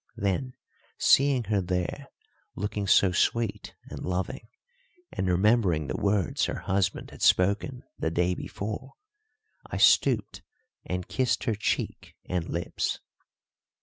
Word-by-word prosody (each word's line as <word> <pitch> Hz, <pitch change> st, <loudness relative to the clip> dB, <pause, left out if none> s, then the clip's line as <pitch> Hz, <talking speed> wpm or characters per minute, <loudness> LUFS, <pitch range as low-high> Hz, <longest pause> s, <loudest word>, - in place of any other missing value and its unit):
Then, 100 Hz, +7 st, -1 dB, 0.4 s
seeing 135 Hz, -3 st, +4 dB
her 105 Hz, -2 st, 0 dB
there 90 Hz, -1 st, -2 dB, 0.5 s
looking 105 Hz, 0 st, -3 dB
so 95 Hz, -1 st, +5 dB
sweet 115 Hz, +5 st, 0 dB, 0.2 s
and -, -, -6 dB
loving, 90 Hz, +4 st, -3 dB, 0.6 s
and 95 Hz, -, -2 dB
remembering 90 Hz, -3 st, +3 dB
the -, -, -3 dB
words 100 Hz, -2 st, +1 dB
her -, -, -4 dB
husband 95 Hz, -1 st, -1 dB
had -, -, -13 dB
spoken 100 Hz, +7 st, +2 dB, 0.2 s
the 80 Hz, -, 0 dB
day 90 Hz, +2 st, +1 dB
before, 110 Hz, +8 st, -6 dB, 0.7 s
I -, -, -4 dB
stooped -, -, +3 dB, 0.4 s
and 90 Hz, -1 st, -3 dB
kissed 130 Hz, -1 st, 0 dB
her 115 Hz, -, +1 dB
cheek 105 Hz, -, -2 dB
and 90 Hz, -2 st, -2 dB
lips. 85 Hz, +1 st, -2 dB
100 Hz, 120 wpm, -27 LUFS, 90-110 Hz, 0.7 s, so